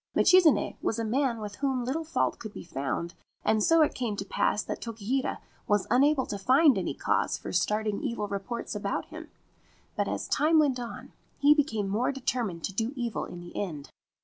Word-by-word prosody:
Michizane 360 -5 +5
was 225 - -1
a 230 - -1
man 245 +1 0
with 205 -1 -7
whom 265 -3 -1
little 295 +6 -2
fault 320 - -1
could 215 - -7
be - - -8
found, 165 +2 -3 0.3
and 215 -1 +3
so 330 +4 +5
it - - +1
came 235 -5 -2
to 200 - -4
pass 205 +1 0
that - - -5
Tokihira 230 +4 -2 0.3
was 205 -3 +2
unable 270 +2 +4
to 205 - -5
find 270 +6 +5
any 190 -2 -2
cause - - 0
for - - -7
starting 210 +1 0
evil 235 -7 -2
reports 200 +4 -4
about - - -2
him; - - -9 0.7
but - - 0
as - - -3
time 315 +2 +3
went 280 -5 +3
on 240 -1 -8 0.2
he 290 +1 +6
became 245 -9 0
more 215 +7 0
determined 240 -10 -2
to 195 - -3
do 225 +6 -1
evil 240 -3 -2
in 175 - -9
the 175 - -11
end. 155 -8 -4
235 Hz, 195 wpm, -28 LUFS, 205-275 Hz, 0.7 s, he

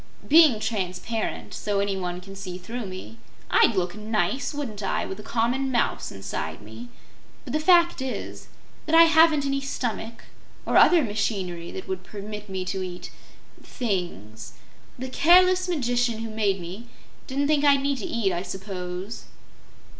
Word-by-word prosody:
Being 300 -7 +7
transparent, 215 0 -3
so 205 -1 -1
anyone 190 -3 -2
can 195 +1 -11
see 185 -2 -6
through 225 +4 -6
me, 115 - -9 0.3
I'd 230 - +5
look 180 -2 0
nice, 215 +5 -1
wouldn't 255 -8 -5
I, - - -1
with 190 - -7
a - - -6
common 245 +5 0
mouse 235 - 0
inside 95 -5 -5
me? 110 +3 -10 0.5
But - - -7
the 305 - +2
fact 345 -2 +4
is 265 -1 -5 0.4
that 320 - +3
I 330 - +10
haven't 320 -3 +5
any 275 0 0
stomach 235 -4 -4 0.4
or - - -1
other 340 -3 +7
machinery 195 -6 -2
that 185 - -7
would 190 -1 -4
permit 210 +1 -8
me 190 -1 -3
to 190 +1 -3
eat 180 -1 -6 0.5
things. 175 - -4 0.4
The 260 - -5
careless 365 +6 +5
magician 245 -7 0
who 225 - -5
made 205 -3 0
me 185 +7 -8 0.4
didn't 275 +2 -1
think 295 0 +2
I'd 280 -1 +5
need 280 -1 0
to - - -4
eat, 230 - 0
I 175 - -2
suppose." 185 +1 -6
215 Hz, 155 wpm, -25 LUFS, 185-270 Hz, 0.5 s, I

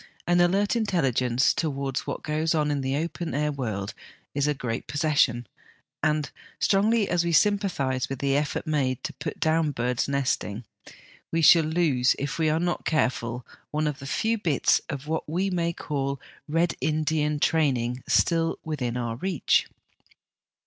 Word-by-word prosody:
An 175 0 +3
alert 195 +5 +2
intelligence 130 - +2
towards 140 -4 -2
what - - -4
goes 155 +2 0
on 150 -1 +1
in 145 -1 -1
the 135 +1 -1
open 165 +2 -3
air 150 +1 +1
world 110 -8 -4 0.4
is 145 0 +1
a 150 - +1
great 115 -3 -4
possession, 145 -5 +1 0.6
and, 150 -1 0 0.3
strongly 210 +2 +3
as 175 -1 +1
we 170 - 0
sympathise 170 - +1
with 135 - -3
the 140 +1 0
effort 145 +3 -1
made 135 -5 0
to - - -4
put - - -6
down 160 0 +2
bird's 125 -2 -1
nesting, 130 -5 -1 0.7
we 165 0 +1
shall 165 +1 +7
lose, 155 -6 +2
if 140 +3 -4
we 160 -1 +3
are 155 +1 +1
not 175 +1 -1
careful, 125 -5 -1 0.2
one 155 +1 -1
of 150 -2 -2
the 140 - -8
few 225 +9 0
bits 160 -9 +2
of 140 0 -5
what 160 0 -3
we 185 +5 0
may 170 -2 0
call 140 -4 -3 0.3
'Red 165 +3 +1
Indian' 155 -1 0
training 130 -6 +1
still 165 -1 +2
within 130 -6 -3
our 115 -2 -3
reach. 185 +1 +1
150 Hz, 160 wpm, -26 LUFS, 130-165 Hz, 0.7 s, shall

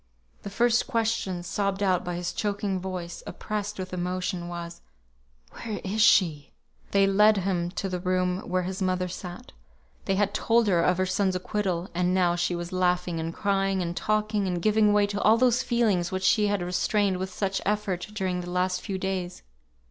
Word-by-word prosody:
The - - -6
first 235 +3 +2
question 225 -6 -1
sobbed 200 +2 -1
out 185 -2 +2
by 175 -1 -4
his 175 0 -3
choking 205 -2 -1
voice, 180 -2 -6
oppressed 210 -1 -4
with 185 -1 -6
emotion, 180 0 -2
was, 170 -1 -7 0.7
"Where 220 -3 -6
is 205 +3 -1
she?" 160 -9 +4 0.4
They 200 0 +4
led 210 +2 +5
him 180 -2 -1
to 195 - -2
the 180 -1 -3
room 180 0 0
where 185 0 +1
his 185 +2 -5
mother 185 -1 0
sat. 180 0 -8 0.5
They 195 - +1
had 205 0 +1
told 230 +2 +2
her 180 -5 +3
of 180 +1 +2
her 185 - +1
son's 185 0 0
acquittal, 185 -2 -2
and 180 +1 +1
now 175 -2 +3
she 175 0 0
was 175 +1 -5
laughing, 180 -2 +1
and 165 +1 -3
crying, 195 0 0
and 170 0 -4
talking, 215 -1 0
and 180 -1 -1
giving 210 +3 +3
way 205 0 +4
to 205 0 -3
all 220 +2 +5
those 245 0 +3
feelings 220 -9 +1
which 185 0 -3
she 210 +2 +4
had 205 -3 0
restrained 185 +2 +1
with 185 +1 -4
such 195 0 -2
effort 205 -3 -1
during 185 -3 -2
the 175 - -7
last 180 0 0
few 195 -3 -4
days. 185 -1 -4
185 Hz, 185 wpm, -26 LUFS, 180-205 Hz, 0.7 s, led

